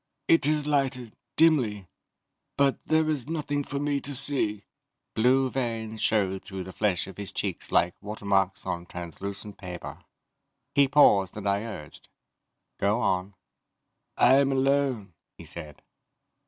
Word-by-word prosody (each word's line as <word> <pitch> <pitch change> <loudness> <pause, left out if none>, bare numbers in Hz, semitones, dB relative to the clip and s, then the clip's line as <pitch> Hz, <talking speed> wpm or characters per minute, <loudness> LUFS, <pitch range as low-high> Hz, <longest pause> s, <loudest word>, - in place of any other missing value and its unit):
"It 165 -4 +4
is 150 -1 +1
lighted, 135 -5 -1 0.2
dimly, 125 - +3 0.7
but 140 -1 +3
there 160 0 +3
is 145 -5 -1
nothing 145 -3 -2
for 140 - -5
me 145 0 0
to 140 0 -4
see." 125 -7 0 0.5
Blue 130 +4 +3
veins 115 -4 -3
showed 95 -3 +1
through 95 -1 -6
the 95 - -9
flesh 95 -2 0
of 95 - -11
his 100 -2 -6
cheeks - - -4
like 85 +1 +3
watermarks 100 -2 0
on 85 0 -4
translucent 100 +4 -7
paper. 90 -2 -7 0.7
He 140 -1 +5
paused 100 -10 +4
and 105 - -6
I 100 0 +2
urged, 75 -10 -9 0.7
"Go 105 +3 +2
on." 95 -3 0 0.8
"I 130 +2 +6
am 140 0 +3
alone," 135 -7 +1 0.2
he - - -10
said. 75 -3 -10
110 Hz, 140 wpm, -27 LUFS, 95-140 Hz, 0.8 s, I